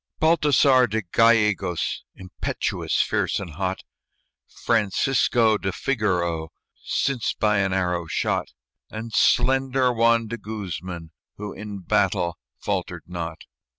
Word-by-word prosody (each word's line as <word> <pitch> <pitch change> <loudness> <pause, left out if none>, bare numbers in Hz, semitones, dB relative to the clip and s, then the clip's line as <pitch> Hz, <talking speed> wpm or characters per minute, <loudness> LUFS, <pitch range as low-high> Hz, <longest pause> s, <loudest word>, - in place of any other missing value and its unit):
Baltasar 145 -5 +4
de 110 +1 -1
Gallegos, 105 -3 +2
Impetuous, 95 -1 -2
fierce - - 0
and 95 -4 -7
hot; 95 +3 -3 0.6
Francisco 115 0 +2
de 95 - -2
Figarro, 90 -10 -1 0.3
Since 135 -5 0
by 105 -1 +2
an 95 -1 +1
arrow 90 -3 -1
shot; - - -1 0.4
And 110 +1 -7
slender 130 0 +3
Juan 115 0 +3
de 115 +2 -5
Guzman, 95 -5 -6 0.3
who 105 -1 -6
In 105 -1 -7
battle 85 -1 0 0.2
faltered - - -3
not. 85 -2 -6
105 Hz, 110 wpm, -24 LUFS, 90-115 Hz, 0.6 s, Baltasar